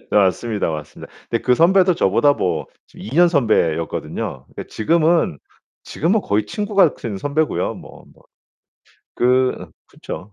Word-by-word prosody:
네 - - 0
맞습니다, 105 +1 +1
맞습니다. 75 -1 -8 0.2
근데 115 - 0
그 125 - +3
선배도 180 +4 +4
저보다 145 +5 +3
뭐 85 - -2 0.3
2 - - -9
년 175 +1 +6
선배였거든요. 85 - -1
근데 - - -7
지금은 160 - +1 0.5
지금은 190 +8 0
거의 105 - -1
친구 210 - -5
같은 150 - +2
선배고요. 150 +6 -1
뭐뭐. - - -14 1.0
그 125 +1 +1 0.2
그쵸. 100 +3 -9
125 Hz, 285 characters per minute, -19 LUFS, 100-165 Hz, 1.0 s, 년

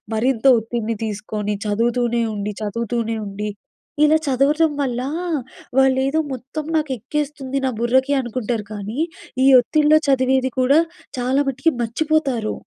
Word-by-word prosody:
మరింత 235 +2 0
ఒత్తిడిని 225 0 -3
తీసుకొని 210 0 -3
చదువుతూనే 235 +2 +1
ఉండి, 205 +1 -3
చదువుతూనే 230 +1 -2
ఉండి, 210 +1 -4 0.5
ఇలా 300 +1 +5
చదవటం 290 +4 +3
వల్ల 250 -3 -1 0.8
వాళ్ళేదో 265 +3 +3
మొత్తం 265 +5 -5
నాకు 305 -3 0
ఎక్కేస్తుంది 275 +2 -3
నా - - +2
బుర్రకి 260 +4 +2
అనుకుంటారు. 240 -3 -3
కానీ 210 +6 -5 0.5
ఈ - - +6
ఒత్తిడిలో 305 +4 +3
చదివేది 260 -1 +2
కూడా 270 +4 +5 0.4
చాలా 255 +3 +1
మటికి 270 +5 +1
మర్చిపోతారు. 265 -2 0
255 Hz, 120 wpm, -21 LUFS, 225-275 Hz, 0.8 s, ఈ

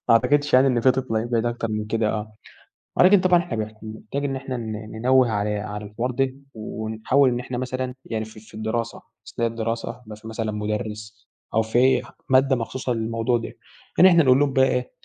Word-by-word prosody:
ما - - +7
أعتقدش 145 +5 +2
يعني 130 +2 +6
إن 125 -3 +2
في 130 - +5
طفل 130 -3 -2
هيبعد 115 +1 0
أكتر 120 -1 -2
من 110 0 -2
كده، 110 0 0
آه. 110 0 -4 0.7
ولكن 190 +2 +7
طبعًا 180 -2 +4
إحنا 175 -10 -4
بنح 110 0 -3
بنحتاج 110 +6 -5
إن 135 -1 -1
إحنا 130 -1 -4
ن 110 -2 -5 0.3
ننوِّه 130 +1 +4
على 105 -1 -1
على 105 0 -6
الحوار 115 +5 -3
ده، 130 +1 0 0.2
ونحاول 110 +5 0
إن 120 0 -1
إحنا 125 0 -5
مثلًا 130 0 -3
يعني 110 -1 -3
في 110 0 -13
في 110 - -18
الدراسة. 110 +2 -3 0.3
أثناء 115 0 0
الدراسة 115 0 -3
بيبقي 110 -1 -9
فيه 110 +1 -10
مثلًا 110 -1 -3
مدرّس، 105 +1 -5 0.3
أو 110 - +3
في 120 +4 +3 0.3
مادة 130 +1 +4
مخصوصة 125 +2 -3
للموضوع 115 +1 0
ده. 115 - -6 0.4
يعني 185 - +8
إحنا 170 -2 +5
نقول 130 0 +5
لهم 145 -2 +2
بقى 130 -1 +5
إيه، 125 -1 -1
115 Hz, 200 wpm, -23 LUFS, 110-130 Hz, 0.7 s, يعني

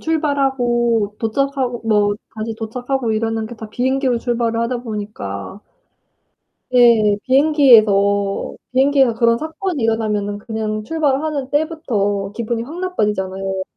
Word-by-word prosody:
출발하고 245 -8 0
도착하고 255 +1 -1
뭐 205 -2 +3 0.2
다시 220 +1 -4
도착하고 245 +2 -2
이러는 225 0 -1
게 240 - -9
다 220 0 -8
비행기로 255 +2 0
출발을 235 -1 -1
하다 235 +1 -1
보니까 205 - -6 1.1
네 235 -4 +5
비행기에서 215 -9 +3 0.2
비행기에서 265 -2 +3
그런 230 0 +2
사건이 320 +1 -4
일어나면은 210 -2 -1
그냥 215 -1 -4
출발하는 290 0 -1
때부터 215 -11 -1
기분이 235 0 -3
확 320 +8 -8
나빠지잖아요. 195 - -2
235 Hz, 315 characters per minute, -19 LUFS, 210-270 Hz, 1.1 s, 네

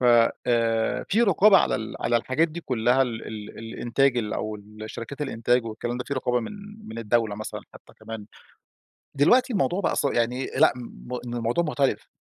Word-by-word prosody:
ف 125 - -1 0.4
آآ، 115 -2 +1
في 225 +4 +3
رقابة 200 0 +6
على - - +1
ال 110 0 -4
على 120 - +2
الحاجات 130 +8 +1
دي 170 +2 -7
كلّها 125 -1 +2
ال 115 -3 -4
ال 105 -1 -8
الإنتاج 120 +3 0
أو 110 -1 -3
الشركات 110 +6 -8
الإنتاج 120 -2 +1
والكلام 120 +2 -4
ده، 125 - -4
في 140 - -3
رقابة 125 -1 0
من 115 - -6 0.4
من 110 +1 -7
الدولة 115 -1 +1
مثلًا 110 - -6
حتّى - - -15
كمان، 110 -2 -7 0.9
دلوقتي 245 - +4
الموضوع 185 -1 +1
بقى - - 0
ص - - +1
يعني 125 0 0
لأ - - +4 0.5
،إن 120 - -4
الموضوع 120 +8 0
مختلف 140 -3 0
120 Hz, 170 wpm, -25 LUFS, 115-140 Hz, 0.9 s, رقابة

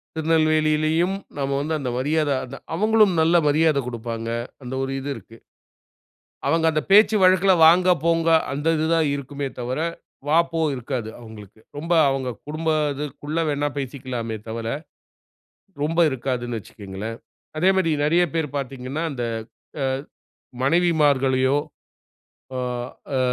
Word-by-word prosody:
திருநெல்வேலியிலும் 155 +2 +2 0.2
நம்ம 140 -1 -1
வந்து 155 +2 -2
அந்த 130 -3 -3
மரியாத 150 +2 +1
அத 130 +2 -9 0.2
அவங்களும் 215 +1 +4
நல்ல 165 +2 +3
மரியாத 155 0 +3
குடுப்பாங்க. 115 -1 -5 0.3
அந்த 125 +1 -6
ஒரு 135 - -3
இது 140 +2 -5
இருக்கு. 115 - -13 1.1
அவங்க 165 0 +2
அந்த 155 -1 0
பேச்சு 215 +2 +7
வழக்குல, 185 +1 +5
"வாங்க, 180 +3 +6 0.2
போங்க" 165 0 +2 0.2
அந்த 145 +3 -3
இது 155 - 0
தான் 160 -2 +2
இருக்குமே 140 0 -4
தவிர, 125 +3 -3 0.5
"வா, 155 +2 +4
போ" 165 - -2 0.2
இருக்காது. 125 -3 -4
அவங்களுக்கு 110 -2 -13 0.2
ரொம்ப 165 +4 -1 0.2
அவங்க 135 -1 -2 0.2
குடும்பத 155 -1 0 0.2
இதுக்குள்ள 145 +3 -5
வேண்ணா 145 0 0
பேசிக்கலாமே 125 -4 -4
தவிர. 115 0 -4 1.2
ரொம்ப 165 +3 +1
இருக்காதுனு 120 -2 -3
வச்சுக்கங்களேன். 105 +2 -7 0.4
அதே 180 +4 +3
மாரி 180 -4 +2
நிறைய 170 +4 +3
பேர் 150 -4 -2
பார்த்தீர்ங்கன்னா 135 +2 -4
அந்த 120 -3 -3 0.6
அ - - +1 0.8
மனைவிமார்களையோ, 140 -4 +3 1.0
அ - - -2 0.6
அ - - +2
145 Hz, 125 wpm, -23 LUFS, 130-165 Hz, 1.2 s, பேச்சு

